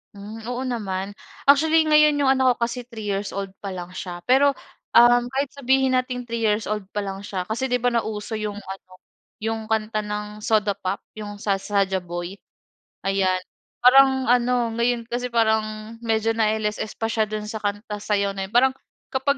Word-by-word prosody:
Hmm, 205 +3 -9
oo 245 +1 -3
naman, 200 -6 -3 0.3
actually 315 +3 +5
ngayon 300 -1 +5
yung 280 -2 +3
anak 260 -2 +3
ko 235 - -2
kasi 240 +1 -3
3 225 -3 -8
years 200 0 -3
old 195 -1 -4
pa 200 - -7
lang 175 0 -7
siya. 180 -1 -7
Pero 275 +2 +4 0.4
uhm, 240 0 +7
kahit 270 +2 -2
sabihin 265 -1 +2
nating 255 -1 0
3 235 -1 -4
years 215 -1 +1
old 210 -3 -3
pa 205 - 0
lang 195 -1 -5
siya, 195 -2 -4
kasi 220 +7 -2
'di 250 -1 -1
ba, 245 - +3
nauso 220 -2 -2
yung 210 -1 -3
ano, 190 -2 -9 0.5
yung 225 0 -2
kanta 215 0 0
ng 210 0 -5
Soda 215 -1 +2
Pop 195 0 -4 0.2
yung 205 -1 -6
sa 200 -1 -1
Saja 195 -1 0
Boy. 175 +2 -6 0.6
Ayan, 190 -1 +1 0.4
parang 265 +1 +6
ano, 245 -1 +2
ngayon 235 0 +1
kasi 245 +1 -2
parang, 220 -1 0
medyo 225 -1 +1
na 220 -1 +2 0.2
LSS 210 0 -3
pa 225 - -2
siya 220 -1 +2
dun 215 0 -4
sa 220 0 -5
kanta 205 +1 -3
sayaw 200 -1 0
na 195 -1 -3
yun. 200 - -21
Parang 260 +2 +5 0.4
kapag 275 +2 +1
220 Hz, 185 wpm, -23 LUFS, 205-245 Hz, 0.6 s, uhm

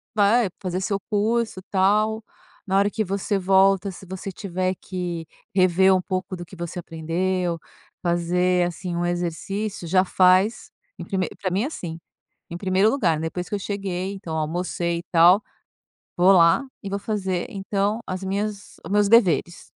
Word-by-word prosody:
vai 210 +1 +4
fazer 185 0 -2
seu 200 +1 -1
curso, 220 -1 0
tal, 215 +3 +2 0.4
na 190 +1 +2
hora 200 +1 +3
que 215 - -1
você 195 +2 -1
volta, 195 +1 +3
se 190 - -12
você 190 +1 -6
tiver 185 0 -2
que 175 -3 -5 0.3
rever 190 +1 +5
um 185 - +1
pouco 185 0 -3
do 175 -1 -8
que 185 - -13
você 170 +1 -5
aprendeu, 170 +2 -2 0.4
fazer 175 +1 +1
assim 175 0 -5
um 175 0 -1
exercício 175 +3 -3
já 185 +2 +4
faz 185 +4 +3 0.3
em - - -7
prime 190 -3 -1
para 185 -2 -1
mim 195 +3 +1
é - - -1
assim, 170 - -6 0.5
em 170 - -5
1º 190 +3 +2
lugar, 175 - +1
depois 170 +2 -4
que 205 - -3
eu - - -3
cheguei, 195 -1 -3
então 185 -5 -6
almocei 170 +2 -2
e - - -9
tal, 175 +4 +6 0.7
vou 180 +2 +5
lá 170 +8 +5 0.2
e 195 - -6
vou 200 +1 -2
fazer 190 -2 -2
então 200 +1 -1
as 185 +1 -4
minhas 200 +1 -3
o - - -7
meus 205 0 +3
deveres. 175 - +3
185 Hz, 165 wpm, -23 LUFS, 175-200 Hz, 0.7 s, tal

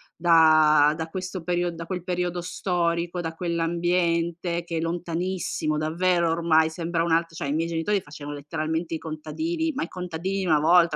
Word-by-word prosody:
da 155 -3 +5
da 160 0 -4
questo 185 +1 -5
period 175 0 0
da 165 0 -8
quel 180 -1 -4
periodo 180 -1 -2
storico, 175 -1 -1
da 165 -1 -4
quell'ambiente 170 0 0
che 170 -1 -4
è - - 0
lontanissimo, 170 -1 -2
davvero, 170 +2 +1
ormai 165 -1 +3
sembra 165 +1 -2
un 170 - -1
alt 165 0 +1
cioè, 165 -3 -4
i 140 - -1
miei 165 +2 0
genitori 170 +5 0
facevano 145 -2 -8
letteralmente 155 +3 -3
i - - 0
contadini, 315 - -3
ma - - -3
i - - -4
contadini 180 +2 -4
di - - -2
una 155 -4 +4
volta, 170 +1 +4
170 Hz, 175 wpm, -25 LUFS, 160-175 Hz, -, da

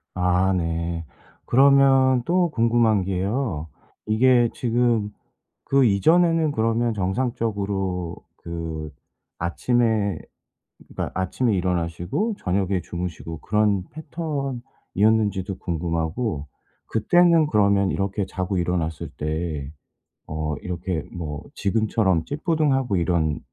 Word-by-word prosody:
아 90 +1 +2
네. 85 -1 -2 0.4
그러면 135 -1 +5
또 175 0 +2
궁금한 115 -4 +3
게요. 95 - -2 0.4
이게 120 +2 +4
지금 120 -3 +1 0.6
그 135 -1 +3
이전에는 160 - +3
그러면 115 0 +1
정상적으로 100 -4 -2 0.2
그 80 -2 -5 0.5
아침에 105 0 +1 0.7
그러니까 - - -4
아침에 105 +5 0
일어나시고 90 - -1
저녁에 95 0 0
주무시고 85 -2 -6
그런 105 -2 +1
패턴이었는지도 120 - -2
궁금하고 85 - -2 0.4
그때는 170 +8 +4
그러면 100 -5 +3
이렇게 100 0 -1
자고 95 0 -2
일어났을 85 -3 -2
때 75 -2 -3 0.6
어 80 -1 -2
이렇게 90 -2 -3
뭐 75 -4 -5
지금처럼 100 -4 +1
찌뿌둥하고 145 - 0
이런 85 -3 0
100 Hz, 245 characters per minute, -23 LUFS, 85-120 Hz, 0.7 s, 그러면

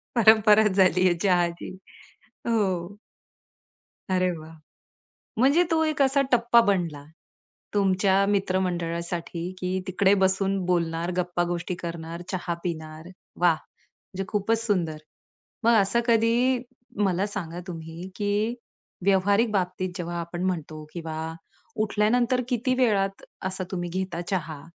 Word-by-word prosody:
परंपराच 220 -2 +6
झाली 185 -1 +4
आहे 180 - +4
चहाची. 175 -3 +1 0.8
हो. 200 -4 0 1.2
अरे 185 0 +2
वाह! 155 0 -11 0.9
म्हणजे 280 +8 +5
तो 320 0 +3
एक 310 -2 0
असा 275 +1 +4
टप्पा 235 -1 +5
बनला 170 -8 0 0.7
तुमच्या 195 -1 +3
मित्रमंडळासाठी, 175 -3 -2
की 185 +1 -1
तिकडे 190 +1 +3
बसून 190 +1 +2
बोलणार, 170 -1 0
गप्पा 175 -1 0
गोष्टी 175 +1 -3
करणार, 170 0 -5
चहा 175 -2 -2
पिणार. 160 -1 -5 0.3
वाह! 175 -1 +5
म्हणजे 190 +4 -11
खूपच 220 +3 0
सुंदर, 175 -8 0 0.7
मग 235 +1 +5
असं 215 +5 +1
कधी 235 +2 +3 0.5
मला 190 0 +1
सांगा 175 -4 -5
तुम्ही, 165 +1 -7
की 210 +2 0 0.5
व्यावहारिक 200 +3 +3
बाबतीत 185 -2 -1
जेव्हा 175 -1 -4
आपण 170 +1 -5
म्हणतो 160 -4 -3
किंवा 160 -2 -5 0.7
उठल्यानंतर 235 +4 +2
किती 250 0 +1
वेळात 200 -6 +1 0.2
असा 190 0 -4
तुम्ही 175 -2 -3
घेता 185 -1 -3
चहा? 160 -6 -3
185 Hz, 115 wpm, -26 LUFS, 170-210 Hz, 1.2 s, परंपराच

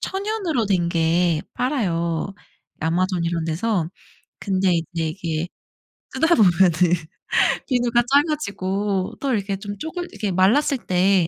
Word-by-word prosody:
천연으로 385 - -1
된 180 -4 +1
게 165 -1 +2
팔아요 180 - -1 0.5
아마존 175 +2 0
이런데서. 170 +2 -1 0.5
근데 190 -2 +1
이제 165 -1 -2
이게 165 -1 -3 0.6
쓰다 325 +2 +3
보면은 185 - +5 1.0
비누가 240 -2 +2
작아지고 200 - 0
또 270 -3 0
이렇게 200 -2 -1
좀 205 +1 -7
쪼글 350 +2 -5
이게 210 -3 -2
말랐을 225 +11 +3
때 185 -1 +3
190 Hz, 250 characters per minute, -22 LUFS, 170-240 Hz, 1.0 s, 보면은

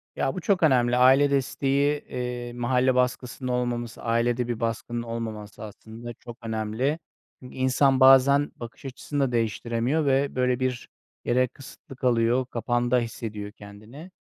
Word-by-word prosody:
Ya, 135 - -1
bu 185 - -4
çok 190 0 +1
önemli. 125 -5 +3
Aile 135 +3 +5
desteği, 140 +2 +1
eee, 125 -1 -5
mahalle 125 +1 +1
baskısının 125 0 -1
olmaması, 120 -2 -2
ailede 120 +1 0
bir 120 -2 -3
baskının 115 +1 -3
olmaması 110 -2 -6
aslında 110 +3 -9
çok 120 +1 -12
önemli. 110 +7 -1 0.4
Çünkü 125 - -12
insan 130 +1 +2
bazen 135 +2 +6
bakış 120 +3 -10
açısını 135 +2 -5
da - - -6
değiştiremiyor 115 +5 0
ve, 140 0 +1
böyle, 125 -1 +1
bir 130 -2 -2 0.4
yere 125 +1 +2
kısıtlı 135 +1 -13
kalıyor, 125 0 +2
kapanda 120 0 0
hissediyor 110 -3 -5
kendini. 110 - -13
125 Hz, 140 wpm, -25 LUFS, 115-130 Hz, 0.4 s, bazen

